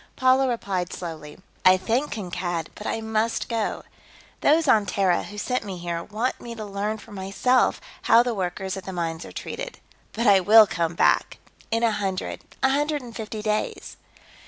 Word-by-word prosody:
Paula 260 0 +4
replied 195 -7 -2
slowly: 160 -4 -7 0.3
"I 185 0 +7
thank 235 +9 0
Kankad, 175 -5 -3
but 210 - -7
I 225 - -2
must 220 +1 -1
go. 225 -3 -2 0.6
Those 310 +1 +3
on 215 -5 +4
Terra 185 -2 +2
who 210 - -10
sent 250 +4 -1
me 195 -3 -6
here 170 -1 -3
want 225 +7 -2
me 235 -1 -7
to 215 -2 -6
learn 205 +2 -2
for 210 - -14
myself 200 +6 +1 0.2
how 230 +1 +6
the 245 -1 -1
workers 190 -1 -3
at 190 -2 -8
the 190 - -5
mines 165 -1 -3
are - - -10
treated. - - -6 0.4
But 230 +2 -2
I 200 -3 +7
will 215 +4 +8
come 170 -4 -2
back - - +2 0.3
in 230 +1 0
a 230 - +4
hundred, 195 -3 -3 0.2
a 265 - +5
hundred 295 0 0
and 235 -2 -10
fifty 215 -1 -5
days." 215 0 -2
210 Hz, 180 wpm, -24 LUFS, 185-235 Hz, 0.6 s, will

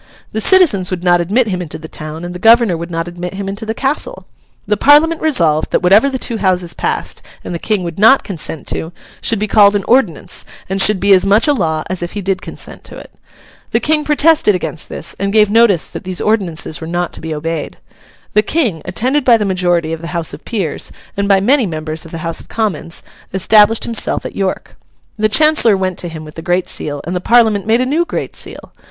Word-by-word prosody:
The 220 - -2
citizens 295 - +4
would 180 -1 -4
not 175 -1 +3
admit 215 +7 +1
him 180 -2 -2
into 165 -4 -6
the 160 - -10
town, 155 +2 -7
and 175 - -6
the 180 - -7
governor 225 -2 +5
would 170 +1 -6
not 165 0 -3
admit 175 +1 -6
him 195 0 -5
into 200 +3 -5
the 220 - -2
castle. 295 - -2 0.4
The 210 - +1
Parliament 300 +8 +4
resolved 165 - +1
that - - 0
whatever 205 +9 +5
the 265 - -3
two 235 -2 -2
Houses 185 -4 0
passed, - - -3 0.2
and - - -6
the 170 - -4
King 210 -1 -1
would 170 +1 -6
not 225 +6 +6
consent 160 -5 -6
to, 165 +2 -4 0.3
should 225 - 0
be 210 - -1
called 205 -1 +5
an 200 - 0
Ordinance, 230 - 0 0.2
and 195 +1 0
should 210 -1 +5
be 200 +1 +4
as 185 - +5
much 205 +5 +3
a 295 - +4
law 160 - -1
as 185 -1 -4
if 175 - -5
he 205 - -4
did 195 0 -2
consent - - -9
to - - -11
it. - - -12 0.6
The - - +1
King 305 0 +1
protested 300 - +3
against 165 -3 -6
this, - - -7
and 200 +1 -1
gave 210 -1 +3
notice 220 -6 +4
that - - -9
these 185 -1 -5
ordinances 180 -8 -1
were 160 - -6
not 175 +1 -2
to - - -9
be 160 - -6
obeyed. 155 0 -4 0.6
The 210 - +4
King, 220 - -1
attended 260 +5 0
by 240 -3 +5
the 210 - -2
majority 175 -4 0
of 165 - -6
the 170 +1 -5
House 165 -1 -2
of - - -10
Peers, 195 -10 -3 0.2
and 200 0 -1
by 195 -1 +4
many 250 +2 +3
members 155 -1 -5
of 165 - -12
the 165 -1 -6
House 165 -1 -1
of - - -13
Commons, 175 -7 -3 0.3
established 210 +3 +4
himself 230 -2 -1
at - - -7
York. 195 -1 -3 0.4
The 215 0 +1
Chancellor 305 -5 +4
went 185 -1 -2
to 175 - -2
him 160 -1 -9
with 155 - -11
the 165 - -8
Great 175 +1 -1
Seal, 145 -1 -5
and 175 +3 -4
the 180 - -2
Parliament 220 -2 +3
made 230 +2 +3
a - - +1
new 305 +6 +1
Great - - -5
Seal. - - -9
195 Hz, 230 wpm, -15 LUFS, 170-225 Hz, 0.6 s, not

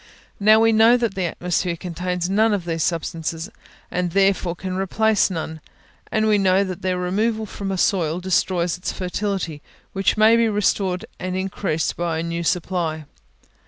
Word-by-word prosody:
Now, 215 +2 +6
we 225 0 +4
know 225 +2 +6
that 235 -4 -1
the 190 -2 -2
atmosphere 175 +1 -1
contains 180 +1 -3
none 210 +3 +3
of 185 -4 -5
these 165 -1 -2
substances, 165 +2 -2 0.4
and 180 0 -1
therefore 195 -3 +2
can 185 +1 -5
replace 210 +3 +2
none; 160 -3 -5 0.5
and 215 0 +1
we 210 -1 +4
know 190 0 +3
that 185 -1 -5
their 185 -1 -1
removal 215 +5 0
from 200 -1 -5
a 190 - -2
soil 175 -4 +1
destroys 180 -1 0
its - - -3
fertility, 185 -4 -3 0.3
which 195 +2 +1
may 220 +2 +6
be 230 -1 +3
restored 195 -3 0
and 185 0 -3
increased 190 -4 -2
by 170 -2 -1
a 160 - -2
new 170 0 -3
supply. 165 -3 -1
185 Hz, 165 wpm, -22 LUFS, 170-205 Hz, 0.5 s, Now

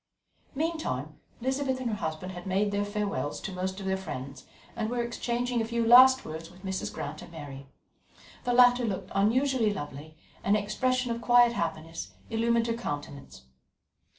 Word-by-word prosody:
Meantime, 270 - -2 0.2
Elizabeth 265 +1 0
and 255 - -2
her - - -1
husband 160 -1 -4
had 175 0 -8
made 200 +2 +1
their 205 0 0
farewells 205 -7 -2
to 195 - -5
most 185 +1 -3
of 195 - -6
their 190 0 +1
friends, 135 -8 -7 0.3
and 220 -1 -2
were 240 0 -1
exchanging 240 0 -1
a - - +1
few 235 0 -1
last 260 +3 +8
words 160 +1 -7
with 185 +2 -15
Mrs. 190 0 -3
Grant 150 +2 -6
and - - -11
Mary. 140 -4 -9 0.8
The 245 - 0
latter 245 0 +6
looked 205 -5 -3
unusually 230 +3 +2
lovely, 150 -3 -7 0.3
and 205 +2 +3
an 205 - -2
expression 250 +4 0
of 235 0 -3
quiet 240 0 +5
happiness 160 - -4 0.2
illumined 230 +1 +2
her 230 - 0
countenance. 145 - -6
205 Hz, 170 wpm, -29 LUFS, 165-240 Hz, 0.8 s, last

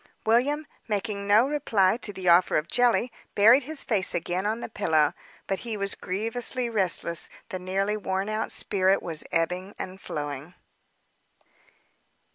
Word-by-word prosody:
William, 270 +7 +2 0.2
making 200 -1 -3
no 215 +5 +5
reply 220 -10 +2
to 230 -3 -2
the 190 -2 -6
offer 175 +1 +5
of 155 +1 -1
jelly, 245 0 +2 0.2
buried 225 +7 +7
his 300 +2 -2
face 200 -5 0
again 180 +3 -1
on 220 +2 -1
the - - -5
pillow. 160 -9 +1 0.3
But 195 - -2
he 230 -3 -5
was 200 -1 -1
grievously 230 +5 -3
restless; 180 -5 0 0.2
the 185 -4 -4
nearly 195 +3 -1
worn 195 -1 -2
out 215 +1 -2
spirit 190 0 +2
was 160 -3 -3
ebbing 180 +4 -1
and 190 +1 -7
flowing. 145 +2 -5
200 Hz, 145 wpm, -26 LUFS, 185-230 Hz, 0.3 s, buried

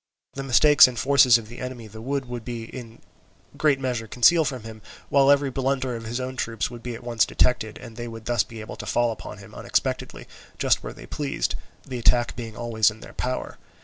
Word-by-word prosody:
The 135 - -5
mistakes 135 +2 +7
and 125 -2 -6
forces 130 -1 +6
of 115 -2 -9
the 120 +2 -10
enemy 125 -2 -6
the 110 +1 -11
wood 135 +2 -2
would 120 -1 -7
in 115 0 -8 0.5
a - - -17
great 150 -3 +3
measure 125 -4 -2
conceal 160 +9 +5
from 130 -5 -4
him, 110 -1 -10 0.3
while 140 -1 +4
every 140 -1 +4
blunder 130 -1 -1
of 115 -1 -7
his 120 +3 -3
own 130 0 -4
troops 115 -1 -2
would 120 -1 -9
be 120 0 -5
at 115 - -10
once 120 -2 +2
detected, 110 -4 +1
and 115 -3 -11
they 120 0 -6
would 115 -1 -8
be - - -11
thus 120 -3 +3
able 110 -2 -8
to - - -7
fall 120 -1 +2
upon 110 - -8
him - - -13
unexpectedly - - -2 0.3
just - - +2
where - - -6
they - - -12
pleased, 145 - -2 0.3
the 125 -2 -5
attack 120 +1 +2
being 115 -3 -7
always 115 -2 +2
in 110 0 -11
their - - -11
power. 130 +1 -4
120 Hz, 220 wpm, -24 LUFS, 115-130 Hz, 0.5 s, mistakes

